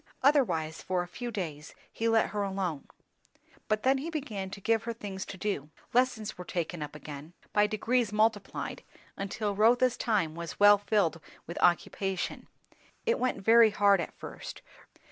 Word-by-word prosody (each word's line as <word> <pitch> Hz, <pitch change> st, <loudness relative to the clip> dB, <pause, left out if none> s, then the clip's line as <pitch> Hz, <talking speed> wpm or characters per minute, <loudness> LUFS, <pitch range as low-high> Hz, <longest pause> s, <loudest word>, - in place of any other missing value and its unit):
Otherwise 180 Hz, -, +2 dB
for 185 Hz, -1 st, -1 dB
a -, -, -9 dB
few 240 Hz, +7 st, -6 dB
days 165 Hz, -9 st, -5 dB, 0.2 s
he 230 Hz, 0 st, 0 dB
let 225 Hz, 0 st, +3 dB
her 210 Hz, -, -1 dB
alone. 190 Hz, -7 st, -2 dB, 0.8 s
But 215 Hz, 0 st, 0 dB
then 265 Hz, +1 st, +3 dB
he 310 Hz, +5 st, -4 dB
began 230 Hz, -, -4 dB
to 200 Hz, -, -8 dB
give 225 Hz, +2 st, +1 dB
her 235 Hz, -, -2 dB
things 200 Hz, -4 st, -6 dB
to 190 Hz, -, -7 dB
do. 185 Hz, -7 st, -2 dB, 0.2 s
Lessons 235 Hz, -5 st, +1 dB
were -, -, -4 dB
taken 175 Hz, -2 st, -3 dB
up 150 Hz, 0 st, -6 dB
again, 150 Hz, +2 st, -9 dB, 0.2 s
by 210 Hz, 0 st, +4 dB
degrees 225 Hz, +1 st, 0 dB
multiplied, 215 Hz, -1 st, 0 dB, 0.3 s
until 200 Hz, +1 st, -2 dB
Rotha's 240 Hz, +4 st, +4 dB
time 200 Hz, -9 st, +1 dB
was 170 Hz, 0 st, -7 dB
well 205 Hz, 0 st, +8 dB
filled 195 Hz, -6 st, +1 dB, 0.2 s
with 170 Hz, -, -6 dB
occupation. 185 Hz, +2 st, 0 dB, 0.6 s
It 465 Hz, 0 st, +2 dB
went 255 Hz, -6 st, -1 dB
very 230 Hz, 0 st, +7 dB
hard 200 Hz, -3 st, +4 dB
at -, -, -7 dB
first. -, -, -8 dB
205 Hz, 165 wpm, -30 LUFS, 175-225 Hz, 0.8 s, well